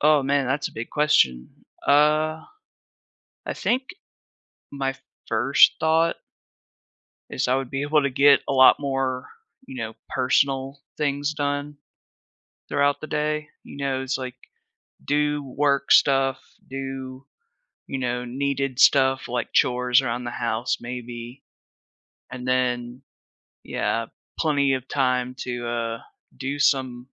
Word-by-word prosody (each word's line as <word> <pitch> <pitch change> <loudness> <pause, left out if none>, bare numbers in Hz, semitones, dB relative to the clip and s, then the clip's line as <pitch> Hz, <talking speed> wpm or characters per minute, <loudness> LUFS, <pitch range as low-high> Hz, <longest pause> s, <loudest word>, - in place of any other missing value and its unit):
Oh, 150 -1 +4
man, 140 -1 +1
that's 135 +3 -1
a - - -17
big 115 +1 -6
question. 65 - +2 0.4
Uh, 155 +2 +3 1.0
I - - -3
think, 255 +2 0 0.9
my 135 -1 -2 0.3
first 120 +5 +5
thought 160 +1 +2 1.1
is - - -1
I 130 - +3
would 135 -2 -4
be 135 - -3
able 150 +1 +2
to 140 - +1
get 140 +2 +5
a 140 - 0
lot 130 0 +7
more, 135 -2 -2 0.4
you - - -9
know, 115 -2 -5
personal 135 +1 0 0.2
things 145 0 -1
done 145 0 -3 0.9
throughout 145 0 +1
the 155 - -6
day, 150 0 -1 0.2
you - - -11
know, 135 -2 -2
it's, 130 0 -2
like, 130 -1 -6 0.7
do 150 0 0
work 140 +1 0
stuff, 135 -1 +4 0.3
do, 135 0 -6 0.6
you 135 - -4
know, 125 -1 -2
needed 135 +1 -2
stuff, 130 -1 +4
like 120 0 -3
chores 125 0 +3
around 125 -1 -3
the 120 - -4
house 115 +1 -1
maybe, 120 +1 -8 0.9
and 125 0 -7
then, 125 0 -1 0.6
yeah, 115 0 -2 0.3
plenty 140 -3 +2
of 130 -1 -5
time 125 -2 0
to, 120 -1 -4
uh, 115 -1 -2 0.4
do 135 +2 -4
some 130 -3 +1
135 Hz, 130 wpm, -24 LUFS, 125-145 Hz, 1.1 s, lot